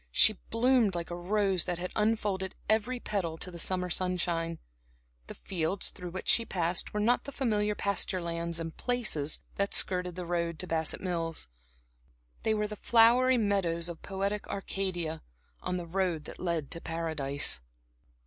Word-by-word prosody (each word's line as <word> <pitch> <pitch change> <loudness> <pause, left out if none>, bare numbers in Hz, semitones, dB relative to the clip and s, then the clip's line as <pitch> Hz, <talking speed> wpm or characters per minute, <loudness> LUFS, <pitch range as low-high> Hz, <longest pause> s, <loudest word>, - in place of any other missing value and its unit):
She 215 - +7 0.2
bloomed 230 -4 +3
like 170 0 -4
a - - -2
rose 190 0 +1
that 180 -1 -2
has 180 +1 -4
unfolded 210 -3 0
every 225 +3 +1
petal 180 -8 -2
to 180 - -3
the 170 - -8
summer 180 0 0
sunshine. 170 -2 0 0.7
The - - -8
fields 180 +1 -2
through 180 -1 -7
which 185 +2 -6
she 230 - +7
passed 175 -4 0
were 210 - -2
not 235 +4 +2
the 280 - -5
familiar 210 -6 +1
pasture 200 -2 +1
lands 170 -1 -2
and 165 -1 -5
"places" 215 - 0 0.2
that 200 0 +1
skirted 180 -2 +2
the 180 -1 -5
road 170 -1 -1
to - - -4
Bassett 160 -1 -1
Mills; 165 - -2 0.9
they 220 - +1
were 210 0 0
the 210 - -6
flowery 240 +4 +5
meadows 180 -6 +1
of 170 -1 -8
poetic 200 +1 -2
Arcadia, 175 -5 -3 0.4
on 180 0 -2
the 175 - -4
road 170 -3 -1
that - - -9
led 170 -5 -2
to 165 - -4
Paradise. 160 - -1
180 Hz, 165 wpm, -30 LUFS, 170-210 Hz, 0.9 s, She